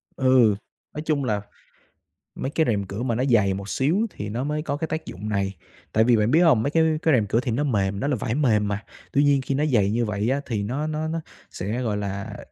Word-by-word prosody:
Ừ, 130 -5 +4 0.4
nói 150 - -4
chung 150 -3 +1
là 105 -5 0 0.9
mấy 135 - -3
cái 160 - +2
rèm 100 -3 +1
cửa 100 +5 -5
mà 120 -3 0
nó 125 - 0
dày 105 -5 +4
một 100 +1 -6
xíu 145 +8 +1 0.2
thì 105 - -5
nó 120 +5 -2
mới 150 +1 -1
có 145 -2 -3
cái 160 +1 -3
tác 160 0 -4
dụng 105 +4 -6
này. 100 -2 -1 0.4
Tại 110 - +4
vì 120 -1 +4
bạn 105 +2 +2
biết 160 - +5
hông? 150 -11 +5
Mấy 140 - 0
cái 160 +1 +3 0.2
cái 160 - +3
rèm 115 -5 +3
cửa 115 - +2
thì 125 -1 -2
nó 135 +6 0
mềm, 100 -7 0
nó 140 - -1
là 145 - +1
vải 115 +1 -2
mềm 110 -8 +2
mà, 105 +2 -3 0.3
tuy 140 - +4
nhiên 140 -1 +4
khi 135 +1 -2
nó 145 +3 +1
dày 105 -9 +2
như 120 +2 +1
vậy 105 +1 -1
á 140 +2 +1
thì 105 -5 -2
nó 135 +8 -2
nó 155 0 -2
nó 165 +1 -2 0.3
sẽ, 110 +7 -3
gọi 105 -4 -1
là 100 +1 -4
120 Hz, 260 wpm, -24 LUFS, 105-145 Hz, 0.9 s, biết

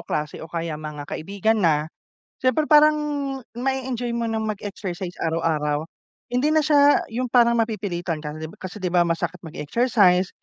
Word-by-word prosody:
klase 150 0 -3
o 160 - -8
kaya 165 -1 -3
mga 150 -1 -6
kaibigan 200 +8 -1
na, 155 -4 +3 0.6
syempre 255 +4 +1
parang 305 0 +7 0.6
ma 265 +2 +1
e 265 0 -4
enjoy 240 -1 -2
mo 235 -1 -1
ng 220 -1 -1
mag 215 -2 -3
exercise 190 -3 -5
araw-araw. 155 -3 0 0.5
Hindi 260 +5 +2
na 315 - +4
siya 290 -1 +5
yung 245 +3 -2
parang 235 -1 +5
mapipilitan 190 -7 -2
ka, 150 +1 -5 0.2
kasi 185 +2 -7
di 180 -2 -3
ba 175 - +5
masakit 170 +1 -1
mag 160 -3 -10
exercise, 185 - +3
195 Hz, 165 wpm, -23 LUFS, 165-240 Hz, 0.6 s, parang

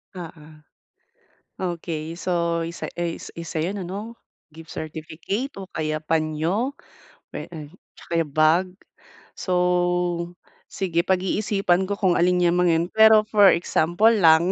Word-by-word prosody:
Oo. 165 -3 -9 1.1
Okey, 165 -3 -4
so, 170 -1 -1
isa 170 +1 -5
ey 170 -1 -3
isa 165 -1 -7
'yun 190 +5 -2
ano? 200 +6 -6 0.4
Gift 165 0 -12
certificate 160 - -5
o 195 - -7
kaya 155 -3 -3
panyo 160 - -1 0.6
puwe - - -6
eh, 155 -3 -8 0.2
tsaka - - -10
yung 150 - -13
bag. 160 +4 +4 0.7
So, 185 - -2 1.2
sige 170 -3 -1
pag-iisipan 190 0 +1
ko 205 - -1
kung 185 -3 +3
alin 180 +1 +3
'yang 175 0 +3
mga 180 -1 +3
'yan. 165 +1 +1
Pero 220 0 +7
for 205 -3 +6
example 175 +5 +2
lang 170 -4 +5
175 Hz, 130 wpm, -23 LUFS, 160-190 Hz, 1.2 s, Pero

